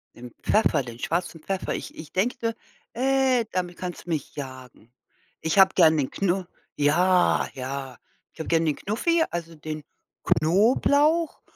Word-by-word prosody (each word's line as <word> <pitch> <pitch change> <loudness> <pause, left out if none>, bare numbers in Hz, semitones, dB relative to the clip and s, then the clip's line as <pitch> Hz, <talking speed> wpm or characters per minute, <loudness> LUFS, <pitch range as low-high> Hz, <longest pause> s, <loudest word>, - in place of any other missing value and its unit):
Den 120 0 -10
Pfeffer, 210 -9 +3
den 120 -1 -10
schwarzen 165 +2 -2
Pfeffer. 190 +3 -3
Ich - - -7
ich 155 -1 -10
denke, 230 +3 -1 0.4
äh, 260 -1 +2
damit 180 -1 -3
kannst 180 -1 -6
du - - -11
mich 155 -5 -3
jagen. 130 -4 -9 0.5
Ich 160 +5 +1
habe 190 0 +7
gern 160 -3 +5
den 135 -3 0
Knu 190 -1 0 0.3
ja, 175 +5 +3
ja. 135 0 -6 0.3
Ich - - -23
habe 160 - -4
gern 165 0 +2
den 150 -2 +1
Knuffi, 325 - +1
also 170 -1 -5
den 155 0 -6 0.4
Knoblauch 285 - +3
175 Hz, 150 wpm, -25 LUFS, 150-210 Hz, 0.5 s, habe